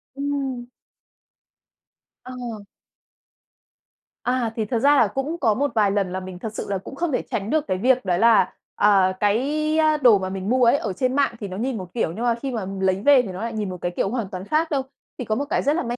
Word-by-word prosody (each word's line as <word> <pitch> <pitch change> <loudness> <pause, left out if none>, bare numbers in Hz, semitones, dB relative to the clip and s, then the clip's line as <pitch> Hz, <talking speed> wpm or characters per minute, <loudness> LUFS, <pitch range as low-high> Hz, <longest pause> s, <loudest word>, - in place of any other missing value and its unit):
Ừm. 275 -3 -3 1.6
Ờ. 245 -4 -7 1.6
À, 250 -2 0
thì 220 - -1
thật 230 +2 -1
ra 285 +4 +5
là 235 - +5
cũng 270 +9 -3
có 225 -8 +3
một 285 +5 -1
vài 210 -3 +3
lần 195 -2 0
là 185 - -3
mình 185 -1 -9
thật 220 +2 -6
sự - - -5
là 200 - 0
cũng 190 - -9
không 340 +2 -1
thể 255 - 0
tránh 200 +1 -2
được 310 +1 0
cái 185 - 0
việc 250 +3 +2
đó 180 -2 +1
là, 220 -3 +4 0.2
à, 195 -3 +4
cái, 290 +10 +1
a, 310 -1 +3
đồ 245 -7 +6
mà 185 0 -3
mình 190 +1 -4
mua 255 +1 +3
ấy 235 - +5
ở 210 -8 -3
trên 255 +6 -1
mạng 280 -4 +1
thì 205 - -5
nó 185 -1 -7
nhìn 245 +2 -2
một 185 -3 -8
kiểu, 225 -9 -1
nhưng 225 - -4
mà 235 -1 +2
khi 265 +3 -5
mà 225 -5 -3 0.2
lấy 190 0 +1
về 285 -3 +7
thì 245 - -7
nó 185 +1 -6
lại 230 0 -3
nhìn 210 -3 -3
một 180 - -6
cái 175 - -2
kiểu - - 0
hoàn 230 -3 -3
toàn 185 0 -7
khác 315 +7 0
đâu. 280 -2 +1 0.4
Thì 250 - -3
có 215 - 0
một 280 +5 -2
cái - - +1
rất 290 +3 +2
là 345 - -1
may 240 -1 -3
235 Hz, 250 wpm, -23 LUFS, 195-270 Hz, 1.6 s, về